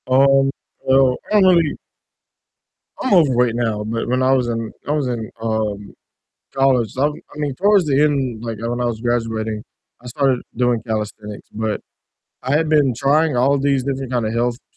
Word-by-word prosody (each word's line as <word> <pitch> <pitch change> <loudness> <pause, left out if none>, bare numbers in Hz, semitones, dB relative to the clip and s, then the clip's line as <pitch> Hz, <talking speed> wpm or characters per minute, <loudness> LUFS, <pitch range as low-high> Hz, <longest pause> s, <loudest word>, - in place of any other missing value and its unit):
Um, 135 +1 +4 0.4
so, 130 -1 +4
I 210 - +5
don't 185 -1 +6
really 160 -3 0 1.2
I'm 260 - 0
overweight 125 -9 +3
now, 110 -3 -1
but 115 +1 -3
when 130 +1 +1
I 130 - +3
was 125 -2 +1
in 115 -2 -3 0.2
I - - -1
was 150 -3 0
in, 115 -3 -4
um, 110 -3 -3 0.6
college, 130 -5 +2
I 140 +3 +3
I - - -3 0.3
mean, 145 -2 -2
towards 200 +2 +3
the 140 -1 +2
end, 135 -6 0
like, 115 -2 -4
when 120 +2 -3
I - - 0
was 115 -2 -3
graduating, 115 -3 -2 0.4
I - - -10
started 130 0 0
doing 120 -2 +1
calisthenics 105 -1 -5
but 110 0 -2 0.6
I 130 - -2
had 155 0 +1
been 145 -4 +3
trying 145 +3 +2
all 135 +3 +3
these 135 -1 +1
different 135 -1 -4
kind 120 -3 0
of 110 - -2
health 120 +1 +1
st 125 - -23
125 Hz, 185 wpm, -19 LUFS, 115-140 Hz, 1.2 s, don't